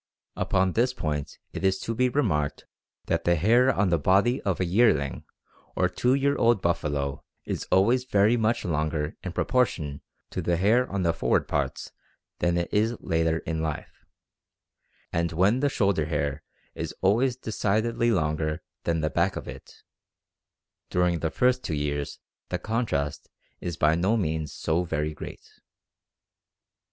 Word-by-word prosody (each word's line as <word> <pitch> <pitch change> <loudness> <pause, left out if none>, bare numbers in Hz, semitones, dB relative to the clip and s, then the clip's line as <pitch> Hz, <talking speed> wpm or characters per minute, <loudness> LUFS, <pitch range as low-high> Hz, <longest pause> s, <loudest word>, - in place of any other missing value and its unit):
Upon 95 0 +1
this 125 +6 +1
point 75 -2 -3 0.2
it - - -5
is 95 0 +3
to 115 - -2
be 125 +2 +2
remarked 90 - 0 0.4
that - - 0
the 85 - +3
hair 120 +10 +4
on 100 -4 +1
the 85 -2 +2
body 100 - +3
of 95 -5 -1
a 90 - +1
yearling 85 - +2 0.5
or - - +3
two 125 +2 +1
year 140 +1 +2
old 115 -2 +3
buffalo 75 -5 -1 0.2
is - - -4
always 120 +7 +3
very 105 -1 +3
much 115 0 0
longer 80 -2 -1
in 95 - -4
proportion 90 - 0 0.3
to - - -3
the 85 -1 +1
hair 115 +8 +3
on 100 -1 -1
the 85 -1 +2
forward 85 - +1
parts - - -2 0.5
than 85 0 +1
it 85 - -2
is 110 +2 +2
later 80 0 0
in 80 0 -2
life, 80 -2 -4 1.2
and 85 0 0
while 95 +9 +3
the 145 +1 +2
shoulder 100 - +1
hair 75 -2 -2 0.3
is - - -5
always 120 +7 +3
decidedly 115 0 0
longer 75 -5 0 0.2
than 85 -1 +1
that 75 -2 -1
back - - +1
of - - -6
it, - - -11 1.1
during 90 -1 +1
the 80 - -1
first 125 +7 +2
two 80 - -2
years 75 -1 -2 0.3
the 90 - -1
contrast 90 - -2 0.3
is 85 -2 -4
by 75 +1 +4
no 95 +7 +2
means 80 -6 -2
so 80 +2 0
very 75 -2 -2
great. 75 - -11
90 Hz, 155 wpm, -26 LUFS, 80-115 Hz, 1.2 s, hair